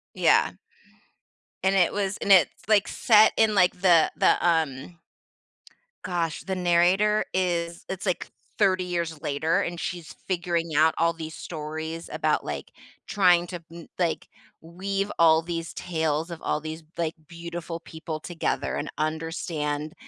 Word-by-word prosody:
Yeah. - - +4 1.1
And 190 +1 +3
it 180 -3 +4
was 200 -1 -2
and 200 - -1
it's, 180 0 +4
like, 210 -2 +4
set 215 -1 +5
in, 220 -2 +3
like, 180 -1 +3
the 175 -4 +5
the, - - +4
um 160 0 -1 1.1
Gosh, 170 -3 -2
the 190 -1 -3
narrator 180 +4 +3
is 170 -2 -1
it's 190 -1 -5
like 180 - -1 0.3
30 185 -3 +3
years 170 -3 -3
later, 160 +5 0
and 175 -2 -4
she's 175 -3 -5
figuring 170 -3 -1
out 160 +1 +5
all 170 0 +2
these 160 -1 -7
stories 160 +1 -6
about, - - 0
like, - - -5 0.4
trying 180 -4 +4
to 175 -1 -7
m 170 -1 -11
like, 170 -2 -1 0.3
we've 195 +4 -3
all 160 -1 +6
these 165 -1 -5
tales 160 -1 -2
of 165 - -7
all - - -1
these, 160 +1 -7
like, 165 -2 -1
beautiful 170 0 -6
people 160 -1 -7
together 165 +1 -2
and - - -3
understand 155 -1 -3
170 Hz, 145 wpm, -26 LUFS, 160-185 Hz, 1.1 s, all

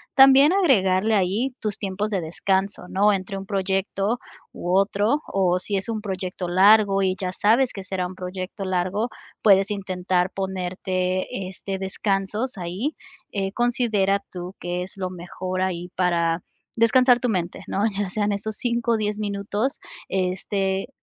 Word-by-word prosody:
también 270 +2 +8
agregarle 220 - +3
ahí 210 +7 0
tus 215 -1 -2
tiempos 200 +1 -2
de 200 -3 0
descanso, 190 +3 -1
¿no?, 205 +2 +3
entre 195 0 -3
un 195 - -6
proyecto 195 +2 -1 0.3
u 180 +1 -2
otro 205 +8 +2
o 185 -2 +1
si 200 +2 -1
es 190 - -2
un 225 -2 -3
proyecto 185 -2 -4
largo 195 +2 +5
y 185 -1 +1
ya 185 -1 -2
sabes 230 +7 +3
que 195 - -7
será 185 -1 -2
un 180 +1 -7
proyecto 185 +2 -5
largo, 185 +5 0 0.3
puedes 195 -1 +5
intentar 185 -2 0
ponerte, 185 +1 -2
este, 190 +1 -5
descansos 195 +4 -2
ahí, 185 - -3 0.4
eh, 195 -1 -2
considera 225 -5 +1
tú 180 0 -7
que 175 0 -3
es 190 - -10
lo 185 -1 -2
mejor 185 +1 -5
ahí, 180 -2 -2
para 170 -2 +1 0.4
descansar 245 +2 +5
tu 250 - +1
mente, 180 -4 -2
¿no?, 200 +2 0
ya 205 -2 -1
sean 205 +1 0
esos 210 +2 -4
5 235 -1 0
o - - +2
10 210 -1 -1
minutos, 205 +5 -2 0.3
este, 190 +1 -1
195 Hz, 155 wpm, -24 LUFS, 185-215 Hz, 0.4 s, también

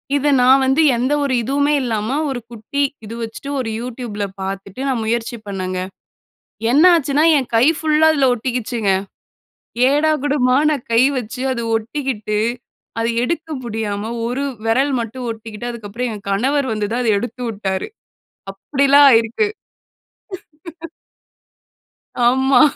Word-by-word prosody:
இத 285 +1 +2
நான் 260 +2 +5
வந்து 265 +4 +3
எந்த 255 +4 0
ஒரு 275 -2 0
இதுவுமே 285 +4 +1
இல்லாம 225 +3 -1
ஒரு 265 -2 -3
குட்டி 235 +5 -4 0.2
இது 220 - -8
வச்சுட்டு 230 +5 -6
ஒரு 230 -3 -2
YouTubeல 235 -4 -5 0.2
பார்த்துட்டு, 195 +4 -6
நான் 255 -4 0
முயற்சி 235 +1 -2
பண்ணேங்க. 185 -2 -3 0.9
என்னாச்சுன்னா? 305 -1 +4
என் 265 -3 -1
கை 230 +3 +5
ஃபுல்லா 315 0 +3
அதில 275 -3 +2
ஒட்டிக்கிச்சுங்க. 240 -3 -1 1.0
ஏடாகுடமா 290 -3 +2
நான் 280 -5 -3
கை 230 +1 +5 0.2
வச்சு 250 +2 -6
அது 235 -2 -3
ஒட்டிக்கிட்டு 225 -3 -3 0.6
அத 225 - 0 0.2
எடுக்க 325 +4 -2 0.2
முடியாம 215 -1 -3 0.2
ஒரு 250 +4 -2 0.2
வெரல் 265 +5 +2
மட்டும் 240 +2 -5
ஒட்டிக்கிட்டு, 225 +1 -7
அதுக்கப்பறம் 235 +1 -5
என் 200 -1 -11
கணவர் 265 +7 +1
வந்து 210 -1 -1
தான் 245 +2 0
அதை 230 - +2
எடுத்து 245 +3 -6
உட்டாரு. 195 - -3 0.6
அப்படிலாம் 280 +7 +4
ஆயிருக்கு. 230 - +2 2.8
ஆமா. 265 +3 +4
245 Hz, 125 wpm, -19 LUFS, 220-275 Hz, 2.8 s, நான்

